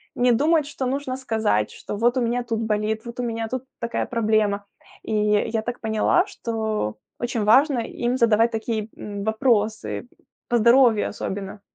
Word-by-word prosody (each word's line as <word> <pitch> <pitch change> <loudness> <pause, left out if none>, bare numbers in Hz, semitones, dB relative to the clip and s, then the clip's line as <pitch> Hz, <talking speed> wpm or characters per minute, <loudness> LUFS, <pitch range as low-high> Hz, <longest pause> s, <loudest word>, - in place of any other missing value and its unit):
не 245 0 +3
думают, 300 +5 +3
что 275 -2 -4
нужно 265 0 -2
сказать, 220 - 0
что: - - -7
"Вот 240 +4 +2
у - - +2
меня 240 +1 0
тут 230 -2 -2
болит, 220 0 -1
вот 235 +1 -8
у - - 0
меня 230 -1 -2
тут 255 +2 -4 0.2
такая 235 0 -2
проблема". 215 -3 +1 0.4
И - - -4
я 210 +1 +1
так 240 +2 -5
поняла, 220 -1 +2
что 220 - -3 0.2
очень 240 -2 -1
важно 260 +5 +5
им 240 +2 -2
задавать 230 -1 +4
такие, 220 -1 -3
м, 205 -1 -6
вопросы, 220 0 0 0.4
по 240 - +3
здоровью 235 -1 +5
особенно. 200 0 -5
225 Hz, 165 wpm, -23 LUFS, 215-245 Hz, 0.4 s, важно